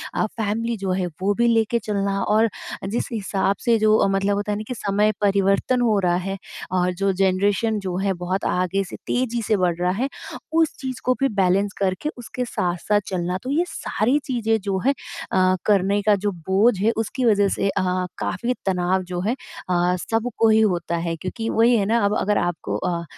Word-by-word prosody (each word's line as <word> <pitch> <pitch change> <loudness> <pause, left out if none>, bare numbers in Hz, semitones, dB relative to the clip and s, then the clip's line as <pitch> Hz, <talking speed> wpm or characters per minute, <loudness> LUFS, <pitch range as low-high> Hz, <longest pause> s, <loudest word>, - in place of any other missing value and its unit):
आप 215 - 0
फैमिली 225 +2 -1
जो 195 -2 -2
है 185 -1 0
वो 200 +2 +2
भी 235 - +4
लेके 230 0 +2
चलना 200 -2 -1
और 220 +2 +3 0.4
जिस 230 - -2
हिसाब 200 -3 0
से 235 -2 +4
जो 215 -1 +4
मतलब 195 +1 +1
होता 205 +1 -2
है 205 +1 -2
कि - - -3
समय 210 -1 +1
परिवर्तन 200 +5 +2
हो 225 -3 +3
रहा 175 -2 +2
है 195 +2 -3 0.3
और 180 0 +1
जो 195 +2 0
जनरेशन 195 +3 +1
जो 185 -3 -4
है 195 0 0
बहुत 185 +2 -3
आगे 185 +2 0
से 195 - -9
तेज़ी 240 -1 0
से 215 -1 +1
बढ़ 180 -2 +1
रहा 180 0 +1
है, 245 +7 -1 0.5
उस 325 -1 +3
चीज़ 260 -1 -5
को 255 - +3
भी 275 - +3
बैलेंस 195 +1 +2
करके 195 +9 -1
उसके 250 +1 -5
साथ-साथ 185 0 0
चलना। 180 -1 -2
तो 255 - -5
ये 320 +5 +2
सारी 250 - 0
चीज़ें 225 -4 +1
जो 195 -1 -1
है 275 - +5 0.4
अ, 185 0 +3
करने 200 0 +3
का 210 0 +4
जो 205 +1 -1
बोझ 190 +6 +2
है 215 +4 +3
उसकी 225 +3 -1
वजह 205 -3 +4
से 195 - 0
अ, 195 - 0 0.4
काफ़ी 240 +1 -1
तनाव 185 0 +1
जो 180 0 -5
है 215 +6 0 0.4
अ, 180 0 +2 0.2
सबको 225 0 +1
ही 220 0 +5
होता 175 -5 0
है। 165 0 -2
क्योंकि 185 +8 -4
वही 235 +2 +4
है 200 - +1
ना 230 +3 +2
अब 200 - +1
अगर 205 +1 +1
आपको 175 -2 -2
अ 175 -2 -2
200 Hz, 200 wpm, -22 LUFS, 185-225 Hz, 0.5 s, है